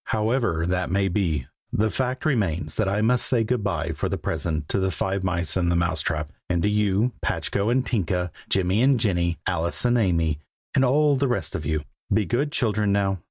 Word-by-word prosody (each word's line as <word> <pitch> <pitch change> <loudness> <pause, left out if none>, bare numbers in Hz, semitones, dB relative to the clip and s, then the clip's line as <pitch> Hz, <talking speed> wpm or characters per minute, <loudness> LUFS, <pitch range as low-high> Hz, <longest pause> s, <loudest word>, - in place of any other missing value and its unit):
However 110 -6 0
that 90 0 -1
may 95 +1 +1
be, 85 -8 0 0.3
the 110 +1 +1
fact 130 +1 -2
remains 90 - 0
that 110 -3 +1
I 100 +2 0
must 125 +2 +3
say 120 -3 +2
good 115 0 -1
bye 85 -5 -1
for 80 - -3
the - - -1
present 80 -2 -2
to - - +1
the 95 0 +1
Five 95 +1 -2
Mice 90 -3 -1
in 90 -2 +1
the 85 - +2
Mouse 85 0 +1
trap, 75 -2 -2 0.2
and 85 -2 +1
to 105 - +3
you, 105 +3 +2
Patchko 100 +2 -1
and 130 +1 +2
Tinka, 90 -5 -1 0.2
Jimmy 95 +3 +2
and 130 -1 +4
Jenny, 85 -6 +1
Alice 85 +4 0
and 120 0 +3
Amy, 85 -7 +1 0.3
and 135 - +3
all 145 +2 +3
the 140 +1 +1
rest 120 -10 -2
of - - -4
you. 80 -1 -1 0.3
Be 105 +1 +3
good 130 - 0
children, 105 -5 +1
now! 100 -1 +1
95 Hz, 205 wpm, -24 LUFS, 85-115 Hz, 0.3 s, and